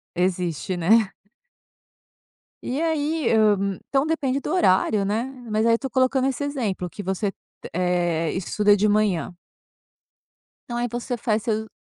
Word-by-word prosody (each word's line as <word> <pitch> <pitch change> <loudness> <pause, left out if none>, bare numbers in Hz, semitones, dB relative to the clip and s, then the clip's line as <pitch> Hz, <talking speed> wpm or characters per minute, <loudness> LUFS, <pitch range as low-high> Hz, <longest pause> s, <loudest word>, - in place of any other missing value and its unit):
Existe, 180 -1 -1
né. 195 +4 +3 1.5
E 265 +5 -2
aí, 315 -3 0
hã, 200 -3 +3
então 275 +2 +1
depende 280 -5 0
do - - -4
horário, 205 - +3
né, 215 +4 0 0.3
mas 215 +2 +1
aí 230 - +5
eu - - +5
estou 265 +2 -2
colocando 260 0 +2
esse 270 +2 -2
exemplo 220 -11 -2
que 205 - -8
você, 190 +1 -2 0.4
eh, 175 -2 0
estuda 205 +3 +2
de 210 +2 +2
manhã. 205 -5 +1 1.3
Então 240 - -4
aí 240 0 -1
você 245 +1 -3
faz 220 -3 0
seu 220 -2 -1
215 Hz, 140 wpm, -23 LUFS, 190-260 Hz, 1.5 s, aí